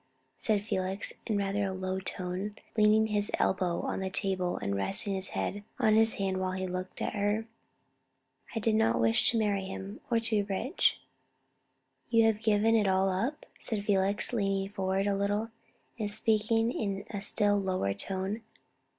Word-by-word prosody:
said 210 Hz, -2 st, +1 dB
Felix, 190 Hz, -1 st, -1 dB
in 215 Hz, -3 st, +1 dB
rather 200 Hz, 0 st, 0 dB
a -, -, -2 dB
low 185 Hz, 0 st, -2 dB
tone, 190 Hz, +2 st, -4 dB, 0.2 s
leaning 215 Hz, 0 st, +5 dB
his 210 Hz, -1 st, +1 dB
elbow 180 Hz, -2 st, +1 dB
on -, -, -2 dB
the 190 Hz, 0 st, -2 dB
table, 185 Hz, -2 st, 0 dB
and 100 Hz, 0 st, -2 dB
resting 195 Hz, -, +2 dB
his 190 Hz, 0 st, -2 dB
head 205 Hz, +1 st, -2 dB
on 215 Hz, -, +3 dB
his 225 Hz, 0 st, +4 dB
hand 190 Hz, -1 st, -1 dB
while 185 Hz, 0 st, -1 dB
he 185 Hz, 0 st, -2 dB
looked 185 Hz, 0 st, -4 dB
at -, -, -2 dB
her. 205 Hz, +1 st, 0 dB, 1.1 s
"I -, -, +1 dB
did 220 Hz, +1 st, +1 dB
not 115 Hz, -, +3 dB
wish 115 Hz, 0 st, +4 dB
to 230 Hz, -, +1 dB
marry 205 Hz, -3 st, +1 dB
him, 195 Hz, +2 st, -7 dB
or 230 Hz, -2 st, +3 dB
to 225 Hz, 0 st, -3 dB
be -, -, +3 dB
rich." 205 Hz, -, 0 dB, 1.1 s
"You 230 Hz, -1 st, +5 dB
have 220 Hz, -1 st, +2 dB
given 220 Hz, +1 st, +3 dB
it 210 Hz, -3 st, +3 dB
all 190 Hz, 0 st, +3 dB
up?" 230 Hz, +11 st, -2 dB
said 210 Hz, -4 st, -2 dB
Felix, 200 Hz, +3 st, +1 dB
leaning 195 Hz, -3 st, 0 dB
forward 195 Hz, -1 st, -1 dB
a 200 Hz, -1 st, +1 dB
little, 205 Hz, +3 st, -1 dB, 0.5 s
and 210 Hz, -2 st, -1 dB
speaking 220 Hz, +2 st, +2 dB
in 200 Hz, -4 st, -3 dB
a 200 Hz, -, -4 dB
still 205 Hz, 0 st, +2 dB
lower 185 Hz, -, 0 dB
tone. 190 Hz, -, -3 dB
200 Hz, 175 wpm, -30 LUFS, 190-215 Hz, 1.1 s, leaning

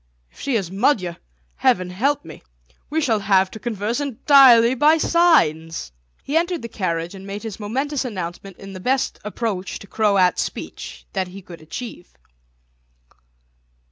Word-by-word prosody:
"If -, -, -21 dB
she 275 Hz, -3 st, -1 dB
is 190 Hz, -6 st, -1 dB
Magyar, 195 Hz, -4 st, +1 dB, 0.4 s
heaven 180 Hz, -, +2 dB
help 265 Hz, -, 0 dB
me! 160 Hz, -, -11 dB, 0.5 s
We 320 Hz, +2 st, 0 dB
shall 230 Hz, -8 st, +1 dB
have 195 Hz, -1 st, +2 dB
to 220 Hz, -, -9 dB
converse 225 Hz, +1 st, -2 dB
entirely 260 Hz, -3 st, +6 dB
by 300 Hz, +5 st, +4 dB
signs." 165 Hz, -, +2 dB, 0.3 s
He 285 Hz, -, -4 dB
entered 345 Hz, -1 st, +1 dB
the -, -, -4 dB
carriage 170 Hz, -5 st, -3 dB
and 195 Hz, 0 st, -10 dB
made 200 Hz, +2 st, -6 dB
his 220 Hz, -3 st, -6 dB
momentous 265 Hz, +7 st, -2 dB
announcement 190 Hz, -4 st, -6 dB
in 195 Hz, 0 st, -10 dB
the 185 Hz, -, -7 dB
best 260 Hz, +7 st, 0 dB
approach 210 Hz, -3 st, -3 dB
to -, -, -12 dB
Croat 200 Hz, -3 st, +2 dB
speech -, -, -6 dB
that 190 Hz, -2 st, -1 dB
he 190 Hz, +2 st, -11 dB
could 170 Hz, -2 st, -12 dB
achieve. 180 Hz, +3 st, -8 dB
210 Hz, 150 wpm, -21 LUFS, 185-260 Hz, 0.5 s, entirely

